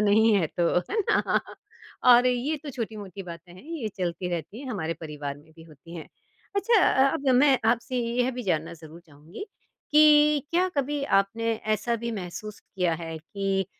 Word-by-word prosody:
नहीं 215 +1 +4
है 180 -5 +2
तो, 170 +2 +1
है 420 - -4
ना? 400 - +1 0.6
और 245 0 +7
ये 255 +5 0
तो 290 - -6
छोटी-मोटी 210 -6 -6
बातें 175 0 -10
हैं 185 - -14
ये 305 -7 -5
चलती 180 0 -3
रहती 175 - -5
है 280 - -8
हमारे 165 -6 -3
परिवार 150 -3 -6
में 150 +2 -19
भी 165 - -13
होती 165 +1 -14
हैं। 160 - -9 0.5
अच्छा 415 +2 +3
अ 270 +1 +3
अब 275 -1 -2
मैं 270 0 +5
आपसे 245 +2 -2
यह 245 +2 0
भी 250 -1 -6
जानना 165 -4 -1
ज़रूर 160 +1 -13
चाहूँगी, 155 - -11 0.5
कि 300 -1 +6
क्या 360 +2 +2
कभी 285 +1 -1
आपने 225 +1 +1 0.2
ऐसा 235 +3 -2
भी 235 +1 -4
महसूस 205 +1 -7
किया 180 -4 -2
है 165 -1 -6
कि 195 +3 -2
210 Hz, 180 wpm, -26 LUFS, 170-255 Hz, 0.6 s, और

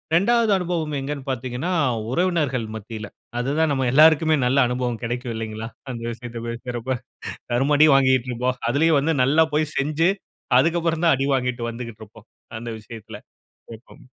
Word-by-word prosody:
2வது 230 +5 +3
அனுபவம் 170 -4 -2
எங்கன்னு 140 0 -5
பாத்தீங்கன்னா, 130 +6 -3 0.4
உறவினர்கள் 150 -7 0
மத்தியில 110 -1 -8 0.3
அது 125 +3 -1
தான் 160 -2 +3
நம்ம 135 -2 0
எல்லோருக்குமே 155 +1 +6
நல்ல 130 +3 +2
அனுபவம் 125 -2 -2
கிடைக்கும் 120 +1 -3
இல்லைங்களா? 110 0 -5 0.2
அந்த 115 -2 -6
விஷயத்த 120 0 -8
பேசுறப 120 +1 -4 0.6
தரும 135 +5 +2
அடி 155 +2 +7
வாங்கிக்ட்டு 130 -2 +3
இருப்போம். 125 +2 -1
அதிலேயும் 150 +4 +3
வந்து 160 +3 0
நல்லா 150 +5 +4
போய் 155 0 0
செஞ்சி 155 +5 +2 0.5
அதற்கு 165 +5 +2
அப்புறம் 165 0 -1
தான் 165 - +5
அடி 135 +1 0
வாங்கி 125 -1 +1 0.2
வந்துகிட்டு 115 -2 -8
இருப்போம். 110 +1 -16 0.3
அந்த 120 +1 -6
விஷயத்தில 110 0 -10 0.6
எப்பவும். 110 - -18
130 Hz, 150 wpm, -23 LUFS, 120-155 Hz, 0.6 s, அடி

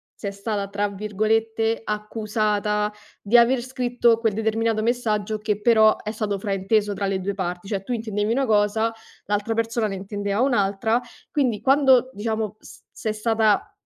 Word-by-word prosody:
sei 200 - -5
stata, 200 0 -3
tra 205 +1 -1
virgolette, 220 +2 0
"accusata", 210 -1 -1 0.3
di 215 +4 +4
aver 240 +2 +4
scritto 245 -2 +1
quel 225 -2 0
determinato 220 +1 0
messaggio 220 -2 0
che 210 -1 -2
però 220 -1 +5
è 215 - -5
stato 210 -2 -2
frainteso 205 +1 0
tra 200 - -2
le 195 -1 -1
2 200 +2 -3
parti, 180 0 -4
cioè 195 -2 -3
tu 220 - -7
intendevi 215 -2 -2
una 265 +3 +1
cosa, 215 +1 +2 0.3
l'altra 205 +2 -1
persona 230 0 0
ne 205 - -2
intendeva 200 +2 -3
un'altra, 220 -2 +1 0.3
quindi 250 -8 0
quando 265 -2 +4
diciamo, 220 0 -3
s - - -14
sei 215 - -3
stata, 220 -1 +1
215 Hz, 155 wpm, -23 LUFS, 205-230 Hz, 0.3 s, però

